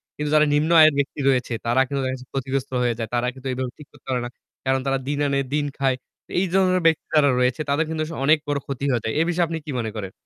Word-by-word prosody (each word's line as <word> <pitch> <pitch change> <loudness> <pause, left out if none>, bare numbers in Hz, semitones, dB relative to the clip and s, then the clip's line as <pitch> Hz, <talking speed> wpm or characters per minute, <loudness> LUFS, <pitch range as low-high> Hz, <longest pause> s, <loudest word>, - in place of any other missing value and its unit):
কিন্তু 150 0 -3
যারা 150 0 +6
নিম্ন 150 +2 +2
আয়ের 155 -1 +7
ব্যক্তি 140 +1 -1
রয়েছে 125 -2 +1
তারা 120 +3 +3
কিন্তু 140 +1 -2
দেখা 130 - -1
যাচ্ছে 130 -1 -9
ক্ষতিগ্রস্ত 135 0 -2
হয়ে 120 -1 +2
যায়। 115 -2 -3
তারা 120 0 +1
কিন্তু 135 0 -9
এভাবে 125 -1 -3
ঠিক 150 - -13
করতে - - -22
পারে 125 -1 0
না। - - -5 0.4
কারণ 130 0 +2
তারা 135 0 +1
দিন 145 0 -1
আনে 140 0 +1
দিন 150 -1 +1
খায়। 135 -1 +1 0.4
এই 190 - +3
ধরনের 185 -1 +3
ব্যক্তি 160 -1 +3
যারা 145 -2 +5
রয়েছে 125 +4 +1
তাদের 145 +3 +2
কিন্তু 160 -1 -2
আসলে 160 -2 -7
অনেক 155 +3 +6
বড় 145 -1 0
ক্ষতি 135 -1 -5
হয়ে 120 -3 0
যায়। 110 - -2
এ - - +4
বিষয়ে 175 0 +2
আপনি 165 0 -3
কি 155 - -5
মনে 110 -2 -3
করেন? 100 -3 -5
140 Hz, 265 wpm, -23 LUFS, 125-155 Hz, 0.4 s, আয়ের